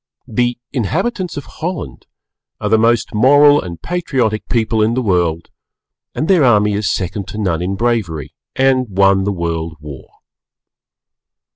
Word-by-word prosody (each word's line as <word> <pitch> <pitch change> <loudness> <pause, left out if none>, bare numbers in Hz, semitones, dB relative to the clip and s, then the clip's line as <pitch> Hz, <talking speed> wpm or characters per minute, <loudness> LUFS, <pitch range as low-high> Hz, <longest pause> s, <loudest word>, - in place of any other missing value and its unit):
The 120 +2 0 0.2
inhabitants 180 - -2
of 145 - -6 0.2
Holland 175 0 -5 0.5
are 105 - -2
the 110 0 +4
most 115 +1 +1
Moral 145 +6 +5
and 85 -2 -8
Patriotic 135 -11 -2
people 110 -1 +1
in 110 +2 +2
the 130 - 0
World, 85 -5 0 0.6
and 155 - -2
their 180 -5 +4
army 105 -4 +3
is 100 0 -1
second 95 +1 -3
to - - -8
none 90 -6 -1
in 95 +2 -2
bravery 100 - -2 0.2
and 130 -1 +2
won 95 0 +3
the 100 - 0
World 85 -3 -3
War. 75 -3 -10
110 Hz, 145 wpm, -17 LUFS, 95-130 Hz, 0.6 s, Moral